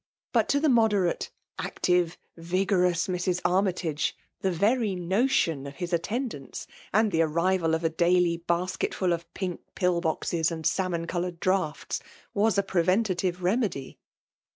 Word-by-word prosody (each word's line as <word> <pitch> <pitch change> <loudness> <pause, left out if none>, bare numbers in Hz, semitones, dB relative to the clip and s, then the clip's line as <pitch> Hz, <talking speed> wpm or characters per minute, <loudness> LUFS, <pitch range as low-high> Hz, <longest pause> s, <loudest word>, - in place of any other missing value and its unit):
But - - +3
to 285 - +3
the 310 - +2
moderate, 220 - +2 0.3
active, 180 -1 +1 0.2
vigovouB 180 0 +1
Mrs. 180 0 0
Armytage, 180 -5 +1 0.2
the 190 - 0
very 205 +3 +1
notion 180 - +1
of 140 - -9
his 175 -1 -4
attendance, 180 - -3 0.3
and 220 -1 +3
die 165 - +1
arrival 165 +1 +2
of 160 - -3
a 165 - +3
daily 170 +1 +2
badcetfiil 180 +1 0
of 170 0 -5
pink 185 -3 -3
pill 180 -2 +1
boxes, 160 0 0
and 160 -2 -5
sahnon 175 -3 0
co 175 - -2
hMired 175 -1 -4
draughts, 185 -5 0 0.3
was 210 0 +2
a 200 - +3
preventive 185 0 +1
remedy. 185 - -1
180 Hz, 140 wpm, -27 LUFS, 170-195 Hz, 0.3 s, But